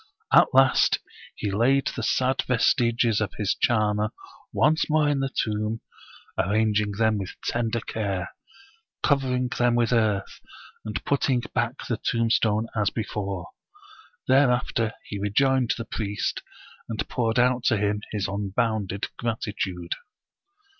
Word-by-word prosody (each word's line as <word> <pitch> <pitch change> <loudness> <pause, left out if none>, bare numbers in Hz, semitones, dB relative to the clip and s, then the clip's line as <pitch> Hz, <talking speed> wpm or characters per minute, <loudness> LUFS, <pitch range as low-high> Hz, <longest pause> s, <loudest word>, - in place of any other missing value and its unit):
At - - +7
last 135 0 +5 0.4
he 100 - -3
laid 130 +7 +3
the 115 - -3
sad 130 +3 +1
vestiges 120 -2 +2
of 105 - -2
his 105 -1 +1
charmer 105 -2 +1 0.4
once 155 +2 +2
more 155 -1 +3
in 145 -1 +1
the 135 0 -1
tomb, 110 -2 -2 0.6
arranging 105 +1 +1
them 110 0 +1
with 95 -1 -6
ten 115 -1 0
der 115 0 -2
care, 100 -6 -3 0.7
covering 130 -3 +1
them 120 -1 +3
with 120 0 +2
earth, 105 -4 0 0.4
and 110 -1 -5
putting 135 -3 +1
back 120 +3 -1
the 115 - -1
tombstone 115 -1 +1
as 105 -3 +2
before. 100 -5 -4 0.8
Thereafter 125 -4 +2
he 100 - -5
rejoined 125 +5 +2
the 115 - -5
priest, 105 -2 -3 0.5
and 110 -2 -3
poured 115 -2 -1
out 125 0 +3
to 110 - +3
him 105 0 0
his 105 -3 -1
unbounded 100 0 -1
gratitude. 100 -6 -3
110 Hz, 130 wpm, -25 LUFS, 105-125 Hz, 0.8 s, At